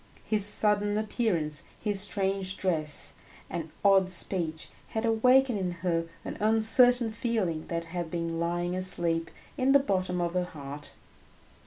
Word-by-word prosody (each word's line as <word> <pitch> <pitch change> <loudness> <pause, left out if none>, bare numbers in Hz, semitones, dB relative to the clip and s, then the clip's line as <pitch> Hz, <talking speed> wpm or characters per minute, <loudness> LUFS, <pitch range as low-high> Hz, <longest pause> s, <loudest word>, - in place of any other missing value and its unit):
His 215 -2 +3
sudden 205 0 +3
appearance, 190 - -1 0.2
his 205 -2 -1
strange 195 -1 -2
dress 155 -5 0 0.4
and 165 -2 -4 0.2
odd 195 -2 +5
speech, 170 -3 -2 0.2
had 220 +1 -3
awakened 250 +1 +3
in 185 -2 -2
her 165 -1 0 0.2
an - - -6
uncertain 225 +2 +4
feeling 215 -8 -2
that 170 0 -3
had 170 0 -5
been 165 -1 -3
lying 175 +1 -1
asleep 170 -3 0 0.3
in 260 +1 +3
the - - +9
bottom 185 -9 -1
of 170 -1 -1
her 180 -1 0
heart. 145 -3 -9
185 Hz, 140 wpm, -28 LUFS, 170-215 Hz, 0.4 s, the